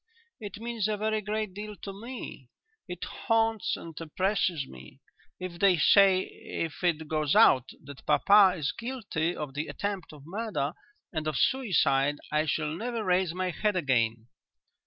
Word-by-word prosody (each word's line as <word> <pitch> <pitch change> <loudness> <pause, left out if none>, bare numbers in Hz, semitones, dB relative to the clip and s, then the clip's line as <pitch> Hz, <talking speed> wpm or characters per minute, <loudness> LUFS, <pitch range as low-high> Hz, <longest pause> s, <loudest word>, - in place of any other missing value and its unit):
"It 205 -3 -7
means 230 -2 -2
a 215 -1 -1
very 215 +1 0
great 210 -1 -3
deal 210 +2 -7
to 195 - -5
me. 215 - -8 0.4
It 180 -1 -6
haunts 225 -3 0
and 165 -1 -10
oppresses 180 -2 0
me. 65 -1 -13 0.4
If 180 -2 -6
they 195 -3 +5
say 190 +4 +6
if 165 +1 -6
it 160 -3 +1
goes 155 -2 0
out 130 - +6
that 140 -1 -12
papa 195 +5 +6
is 150 -2 -1
guilty 205 -9 -3
of 150 -3 -5
the 150 +3 -3
attempt 200 -3 -4
of 150 -3 -13
murder, 175 -6 -2 0.4
and 155 -2 -2
of 155 -3 -1
suicide, 150 - +2 0.2
I 155 +1 +1
shall 150 +1 -1
never 230 +3 -3
raise 180 -2 +1
my 185 0 -1
head 210 +3 0
again." 115 -8 +1
180 Hz, 155 wpm, -28 LUFS, 150-210 Hz, 0.4 s, say